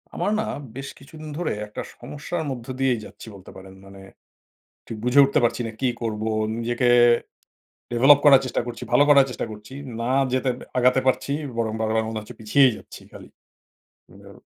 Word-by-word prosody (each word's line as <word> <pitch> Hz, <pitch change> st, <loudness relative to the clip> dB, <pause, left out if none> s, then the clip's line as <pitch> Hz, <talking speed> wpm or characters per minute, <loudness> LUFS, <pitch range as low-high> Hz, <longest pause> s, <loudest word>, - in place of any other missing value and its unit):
আমার 205 Hz, -, -1 dB
না 220 Hz, -, 0 dB, 0.3 s
বেশ 135 Hz, +1 st, -6 dB
কিছুদিন 155 Hz, +2 st, -11 dB
ধরে 175 Hz, -1 st, -2 dB, 0.2 s
একটা 105 Hz, -, -7 dB, 0.2 s
সমস্যার 150 Hz, +6 st, -5 dB
মধ্য 120 Hz, -3 st, -7 dB
দিয়েই 130 Hz, -3 st, +1 dB
যাচ্ছি -, -, -13 dB
বলতে 95 Hz, -1 st, -13 dB
পারেন। 95 Hz, 0 st, -12 dB
মানে 95 Hz, 0 st, -13 dB, 0.9 s
ঠিক 115 Hz, -, -6 dB
বুঝে 125 Hz, +3 st, +3 dB
উঠতে 140 Hz, +2 st, +1 dB
পারছি 120 Hz, +1 st, +1 dB
না -, -, -6 dB
কি 130 Hz, -, +1 dB
করবো? 110 Hz, -1 st, -3 dB, 0.3 s
নিজেকে 120 Hz, +1 st, 0 dB, 1.0 s
ডেভেলপ 135 Hz, +4 st, +6 dB
করার 135 Hz, -2 st, +8 dB
চেষ্টা 125 Hz, -, -1 dB
করছি, 120 Hz, -, -7 dB
ভালো 145 Hz, -, +5 dB
করার 140 Hz, -2 st, +7 dB
চেষ্টা 125 Hz, -, -4 dB
করছি। 105 Hz, +3 st, -11 dB, 0.3 s
না 115 Hz, +1 st, -2 dB, 0.2 s
যেতে 130 Hz, 0 st, 0 dB, 0.3 s
আগাতে 125 Hz, +1 st, +4 dB
পারছি। 130 Hz, +1 st, 0 dB, 0.3 s
বরং 110 Hz, -2 st, -1 dB
বারবার 110 Hz, 0 st, 0 dB
মনে 110 Hz, -1 st, -4 dB
হচ্ছে 110 Hz, +3 st, -12 dB
পিছিয়েই 125 Hz, +5 st, +4 dB
যাচ্ছি -, -, -13 dB
খালি। -, -, -13 dB, 0.8 s
হুম -, -, -15 dB
125 Hz, 170 wpm, -23 LUFS, 110-135 Hz, 1.0 s, করার